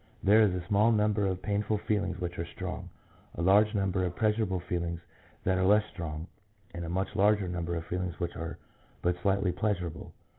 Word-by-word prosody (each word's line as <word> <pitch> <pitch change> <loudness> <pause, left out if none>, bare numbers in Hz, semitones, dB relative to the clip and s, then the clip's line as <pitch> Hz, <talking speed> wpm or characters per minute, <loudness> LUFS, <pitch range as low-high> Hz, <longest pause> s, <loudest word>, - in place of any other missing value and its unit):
There 105 +3 +6
is 105 -3 +5
a 90 -1 -4
small 105 +3 +4
number 105 -2 +2
of 95 -1 -3
painful 105 +1 0
feelings 105 0 -1
which 90 -1 -4
are 85 - -1
strong, - - -6 0.5
a - - -3
large 105 +4 +5
number 95 -2 +1
of 90 -1 -2
pleasur 110 0 +2
able 95 -4 0
feelings 85 -1 -3 0.4
that 95 0 +2
are - - +2
less 105 +2 +5
strong, 80 -3 -5 0.5
and 85 - -5
a 80 - -4
much 95 +3 -2
larger 105 -1 +3
number 85 -1 -2
of 85 0 -4
feelings 90 -2 -3
which 85 -1 -3
are 85 +1 -5 0.5
but 90 0 0
slightly 100 -1 +2
pleasurable. 90 -3 -2
95 Hz, 195 wpm, -30 LUFS, 85-105 Hz, 0.5 s, There